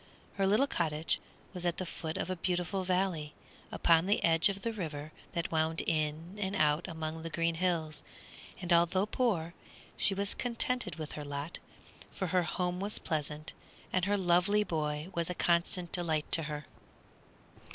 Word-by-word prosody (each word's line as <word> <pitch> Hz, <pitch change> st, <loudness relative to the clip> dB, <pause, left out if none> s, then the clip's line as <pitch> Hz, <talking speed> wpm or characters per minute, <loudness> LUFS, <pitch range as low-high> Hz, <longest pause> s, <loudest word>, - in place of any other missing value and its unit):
Her 195 Hz, -1 st, +3 dB
little 215 Hz, +8 st, +4 dB
cottage 160 Hz, -, 0 dB, 0.3 s
was 180 Hz, -2 st, -5 dB
at 175 Hz, -1 st, 0 dB
the 185 Hz, -, -2 dB
foot 160 Hz, -2 st, -4 dB
of 185 Hz, -, -2 dB
a -, -, -1 dB
beautiful 180 Hz, +2 st, -1 dB
valley, 180 Hz, -5 st, 0 dB, 0.4 s
upon 165 Hz, +1 st, +4 dB
the 205 Hz, -, +2 dB
edge 165 Hz, +2 st, +5 dB
of 195 Hz, 0 st, -4 dB
the 230 Hz, -, -1 dB
river 155 Hz, -6 st, -5 dB, 0.2 s
that 170 Hz, -1 st, -2 dB
wound 160 Hz, 0 st, +1 dB
in 160 Hz, +5 st, -1 dB
and 195 Hz, 0 st, -1 dB
out 150 Hz, 0 st, +2 dB
among 160 Hz, -1 st, -4 dB
the 165 Hz, -, -5 dB
green 165 Hz, +1 st, +1 dB
hills; 165 Hz, -3 st, 0 dB, 0.6 s
and 175 Hz, -2 st, +1 dB
although 175 Hz, +3 st, +4 dB
poor, 205 Hz, -8 st, 0 dB, 0.4 s
she 195 Hz, -, +4 dB
was 200 Hz, +1 st, 0 dB
contented 245 Hz, -3 st, 0 dB
with 155 Hz, -2 st, -6 dB
her 150 Hz, -, -5 dB
lot, 145 Hz, +3 st, -5 dB, 0.6 s
for 190 Hz, -, -2 dB
her 180 Hz, -, +5 dB
home 180 Hz, +1 st, -1 dB
was 205 Hz, +2 st, -1 dB
pleasant 155 Hz, -1 st, -2 dB, 0.4 s
and 185 Hz, -1 st, +2 dB
her 205 Hz, 0 st, +2 dB
lovely 190 Hz, +3 st, +3 dB
boy 150 Hz, -2 st, -2 dB
was 170 Hz, 0 st, -1 dB
a 180 Hz, -, -2 dB
constant 170 Hz, +1 st, +2 dB
delight 160 Hz, -4 st, 0 dB
to 165 Hz, -, +8 dB
her. 150 Hz, 0 st, -4 dB
170 Hz, 170 wpm, -32 LUFS, 160-190 Hz, 0.6 s, to